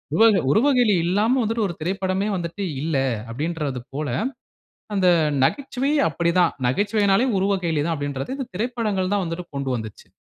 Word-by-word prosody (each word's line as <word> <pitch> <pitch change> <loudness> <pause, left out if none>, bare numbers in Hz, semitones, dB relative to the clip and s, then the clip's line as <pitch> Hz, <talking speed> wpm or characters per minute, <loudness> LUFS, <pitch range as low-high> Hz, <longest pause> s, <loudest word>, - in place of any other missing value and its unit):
உவ 220 - +5 0.3
உருவக்கேலி 245 - +4
இல்லாம 210 +9 +2
வந்துட்டு 225 0 0
ஒரு 170 - -6
திரைப்படமே 190 +3 -1
வந்துட்டு 170 +3 -4 0.2
இல்ல 155 -2 0 0.3
அப்படிங்கிறது 145 0 -3
போல 145 0 -3 0.9
அந்த 185 -2 +3 0.4
நகைச்சுவை 275 - -1 0.2
அப்படி 170 -1 0
தான். 180 - +3
நகைச்சுவைன்னாலே 205 - +2
உருவக்கேலி 180 -6 0
தான் 165 - 0
அப்படிங்கிறதை 145 - -4
இந்த 265 - -4
திரைப்படங்கள் 210 -4 -1
தான் 200 -2 +1
வந்துட்டு 165 +1 -5
கொண்டு 140 -1 -2
வந்துச்சு. 110 -2 -9
185 Hz, 140 wpm, -23 LUFS, 160-215 Hz, 0.9 s, உவ